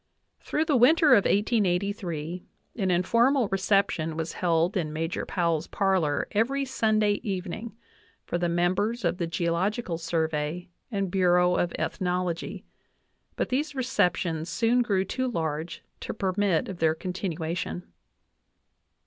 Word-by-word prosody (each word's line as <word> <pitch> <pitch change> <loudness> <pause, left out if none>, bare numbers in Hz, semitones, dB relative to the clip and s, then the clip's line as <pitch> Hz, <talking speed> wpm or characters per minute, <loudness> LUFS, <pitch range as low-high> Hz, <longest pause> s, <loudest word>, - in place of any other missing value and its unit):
Through 310 - -1
the 305 -3 +2
winter 300 +6 +5
of 205 -6 +6
1883 185 -5 0 0.3
an 190 -4 0
informal 230 +8 +3
reception 190 -4 +1
was 160 0 -3
held 170 +1 +1
in 165 -5 -1
Major 165 +2 -3
Powell's 170 -3 0
parlor 185 -8 +1
every 270 +6 +1
Sunday 215 -5 +1
evening 200 +3 -5 0.5
for 175 - -2
the 175 0 0
members 185 +6 0
of 170 - 0
the 170 - -1
Geological 170 +3 -1
Sur 165 -1 0
vey 160 +4 -3 0.2
and 195 -4 -1
Bureau 180 -1 +3
of 175 -1 0
Ethnology, 180 +1 -2 0.7
but - - -1
these 290 +3 -1
receptions 180 -10 0
soon 235 +6 +2
grew 195 -5 +1
toojarge 165 - -3 0.2
to - - -5
permit 195 -3 +1
of 190 -3 -7
their 160 -1 +3
continuation. 175 -1 -4
185 Hz, 125 wpm, -27 LUFS, 170-215 Hz, 0.7 s, of